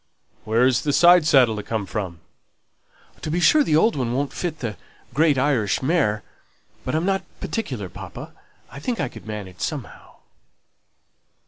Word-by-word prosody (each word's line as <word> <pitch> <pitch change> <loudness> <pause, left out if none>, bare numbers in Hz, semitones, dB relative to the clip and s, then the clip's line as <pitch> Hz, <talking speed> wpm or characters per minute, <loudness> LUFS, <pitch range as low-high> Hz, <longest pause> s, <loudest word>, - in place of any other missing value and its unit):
"Where 115 +3 +3
is 130 -2 +3
the 145 - 0
side 175 -1 +6
saddle 125 -7 +5
to - - -3
come 110 -1 -3
from?" 95 -5 -5 1.0
"To - - -4
be 170 +3 0
sure, 300 +11 +5
the 155 - +1
old 220 +9 +4
one 125 -4 -1
won't 140 +2 -1
fit 170 -3 -3
that 110 -5 -4 0.3
great 150 +1 +3
Irish 130 -6 +1
mare. 130 - +1 0.6
But 130 - -2
I'm 160 +2 0
not 195 -1 +1 0.2
particular, 125 - -4
papa. 90 - -9 0.4
I 140 - -9
think 235 - -3
I 135 - -1
could - - -13
manage 100 -4 -7
somehow." - - -6
135 Hz, 160 wpm, -23 LUFS, 110-160 Hz, 1.0 s, side